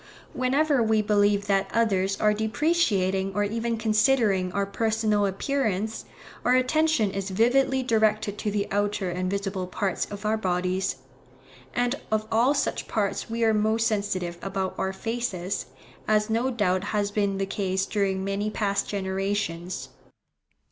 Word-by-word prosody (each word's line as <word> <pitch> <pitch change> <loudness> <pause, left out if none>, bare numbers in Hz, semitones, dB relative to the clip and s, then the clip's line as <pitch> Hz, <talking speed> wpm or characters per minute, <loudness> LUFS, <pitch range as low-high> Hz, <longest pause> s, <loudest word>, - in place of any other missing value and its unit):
Whenever 275 +2 +2
we 220 -1 +3
believe 205 -1 +2
that 195 -1 +1
others 195 -4 +1
are 210 0 +3
depreciating 215 - +1
or 205 - +2
even 230 +2 -1
considering 215 -4 +2
our 200 +1 0
personal 215 0 +1
appearance, 220 0 -1 0.4
our 250 - +4
attention 255 -4 +2
is 195 0 -3
vividly 260 +6 +2
directed 215 -3 +1
to 210 - -2
the 200 -1 -1
outer 205 -2 0
and 180 +1 -2
visible 195 -1 -2
parts 190 +1 -1
of 205 +1 -8
our 215 +1 +2
bodies; 185 -1 -1 0.8
and 245 +3 0
of 215 0 +1
all 240 +6 +3
such 280 - -1
parts 205 -1 -1
we 230 +1 -1
are 220 -1 +4
most 220 +2 +2
sensitive 190 -5 -1
about 195 -1 -2
our 190 - 0
faces, 200 -3 -3 0.4
as 215 0 +2
no 235 +4 +1
doubt 195 -6 0
has 205 -1 -1
been 200 -1 0
the 195 - 0
case 195 -1 -1
during 195 -2 -1
many 200 +2 -1
past 200 -2 -1
generations. 190 -2 -2
205 Hz, 145 wpm, -26 LUFS, 195-225 Hz, 0.8 s, our